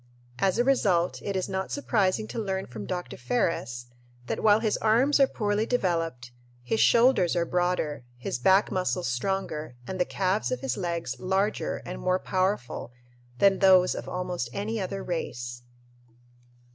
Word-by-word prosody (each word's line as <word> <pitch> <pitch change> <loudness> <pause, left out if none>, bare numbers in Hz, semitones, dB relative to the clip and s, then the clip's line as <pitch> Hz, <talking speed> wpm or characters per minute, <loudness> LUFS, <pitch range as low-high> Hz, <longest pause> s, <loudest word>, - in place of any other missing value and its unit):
As 195 0 +2
a 240 - +3
result, 195 -10 +2
it 200 - -3
is 185 - -1
not 190 0 -3
surprising 215 -6 0
to - - -4
learn 195 -3 -2
from 110 -4 -8
Dr. 180 -1 -4
Ferris 125 - -1 0.4
that - - -3
while 210 0 +5
his 220 -2 0
arms 245 +7 +3
are 275 - +6
poorly 210 -1 -1
developed, 165 - -1 0.3
his 220 - -1
shoulders 235 -8 +4
are 170 -1 +1
broader, 175 -6 -1
his 125 0 -4
back 190 +10 +4
muscles 185 -3 -1
stronger, 150 +1 -2
and 185 +5 -5
the - - +5
calves 195 +4 -1
of 255 - -2
his 270 - -1
legs 170 -7 -3
larger 190 +3 -1
and 180 - -6
more 185 0 +2
powerful 185 - -2 0.5
than 195 +3 +4
those 185 -2 +6
of - - -6
almost 180 -8 -3
any 215 +2 -2
other 195 +1 -4
race. 120 -8 -4
185 Hz, 160 wpm, -27 LUFS, 170-205 Hz, 0.5 s, are